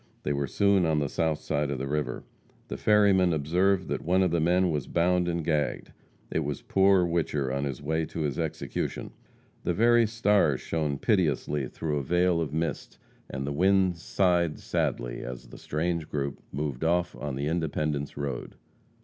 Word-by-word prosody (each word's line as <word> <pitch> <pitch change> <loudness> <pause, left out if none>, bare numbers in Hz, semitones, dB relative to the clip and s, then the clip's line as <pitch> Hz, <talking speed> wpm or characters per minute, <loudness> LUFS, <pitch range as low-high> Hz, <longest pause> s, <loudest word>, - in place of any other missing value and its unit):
They - - 0
were 70 0 -1
soon 100 +5 +3
on 80 -2 +2
the 75 -1 +1
south 80 +2 0
side 75 0 -2
of 70 - -2
the 65 - -3
river. 70 -3 -2 0.5
The - - -4
ferryman 100 -4 +4
observed 90 +6 +1
that - - -2
one 90 +3 +2
of 90 - +1
the 85 - +1
men 90 +2 +3
was 75 -4 -2
bound 90 +1 +2
and 85 -2 -2
gagged. 75 -3 -1 0.4
It - - +1
was - - -3
poor 95 -1 +4
Whicher 75 -6 -1
on 70 +1 -1
his 70 0 -5
way 80 +2 0
to 80 - -5
his 75 -4 -2
execution. - - -3 0.5
The - - 0
very 120 +1 +4
stars 105 - +2
shone 75 -3 -2
piteously 75 - +1
through 75 +1 -3
a 70 - -2
veil 90 +2 +2
of 75 -4 -3
mist, 80 0 -3 0.3
and 70 +1 -4
the 70 - -2
winds 95 +1 +2
sighed 90 -5 +1
sadly - - -2
as 60 -1 -8
the - - -12
strange 85 +1 -2
group 70 -1 -3
moved 70 -2 -3
off 90 +2 +1
on 75 -2 -4
the 70 +2 -2
Independence 75 -3 -2
road. 70 -1 -4
80 Hz, 180 wpm, -27 LUFS, 70-90 Hz, 0.5 s, ferryman